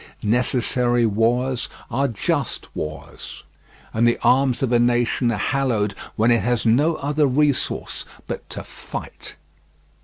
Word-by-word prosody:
Necessary 120 +1 +2
wars 120 +4 +1 0.2
are 135 +3 +1
just 115 - -2
wars, 75 0 -7 0.5
and 115 +2 +3
the 120 - +3
arms 130 0 +3
of 130 - 0
a 120 - +4
nation 120 0 +2
are 110 - -1
hallowed 115 -8 0 0.2
when 115 +3 +3
it 115 - +4
has 120 -1 0
no 145 +9 +3
other 145 0 +1
resource 145 +1 0 0.2
but - - -6
to - - -6
fight. - - -8
120 Hz, 130 wpm, -22 LUFS, 115-135 Hz, 0.5 s, a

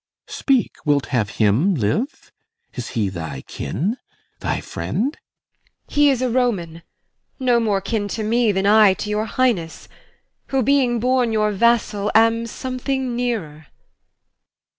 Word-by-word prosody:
Speak, 265 -4 0
Wilt 145 -3 +2
have 110 -5 +1
him 120 - +3
live? 140 - -2 0.4
Is 125 -3 -5
he 105 -3 +1
thy 80 -7 -6
kin? 155 - -3 0.4
thy - - -2
friend? 190 - -3
IMOGEN. - - -28
He 290 0 +5
is 260 -2 +1
a 255 - +1
Roman, 195 -10 -1 0.6
no 250 -2 +3
more 210 -4 0
kin 205 0 -2
to 215 +2 -4
me 230 +1 +2
Than 190 0 -1
I 210 -2 +6
to 210 - -5
your 210 +1 0
Highness; 220 -12 -1 0.6
who, 270 -1 0
being 255 -2 +2
born 250 0 +1
your 215 -1 +1
vassal, 210 -1 +1
Am 230 +1 +4
something 260 0 -3
nearer. 190 -12 -3
220 Hz, 140 wpm, -21 LUFS, 165-245 Hz, 0.6 s, I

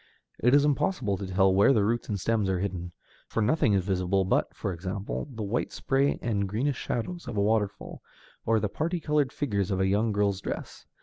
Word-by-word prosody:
It 125 +3 +5
is 145 0 +5
impossible 140 - +1
to 100 - -5
tell 95 0 +3
where 100 +8 +5
the 105 - +3
roots 120 +3 -1
and 100 -2 -1
stems 110 0 0
are 95 - +1
hidden, 90 -2 -3 0.4
for - - -3
nothing 115 0 +3
is 95 -2 +2
visible 95 0 +1
but - - +1
(for 95 - -4
example) 95 - -4
the 110 -3 -5
white 105 +4 -1
spray 135 +1 +1
and 100 -4 0
greenish 125 +6 -1
shadows 155 +6 -4
of 120 -4 -4
a 100 - +3
waterfall, 105 -1 -1 0.4
or 115 0 +2
the 105 - 0
parti 165 - -2
colored 150 -4 +1
figures 100 -9 -1
in 95 -2 0
a - - +2
young 105 +4 +2
girl's 100 -1 0
dress. - - -6
105 Hz, 205 wpm, -28 LUFS, 95-125 Hz, 0.4 s, It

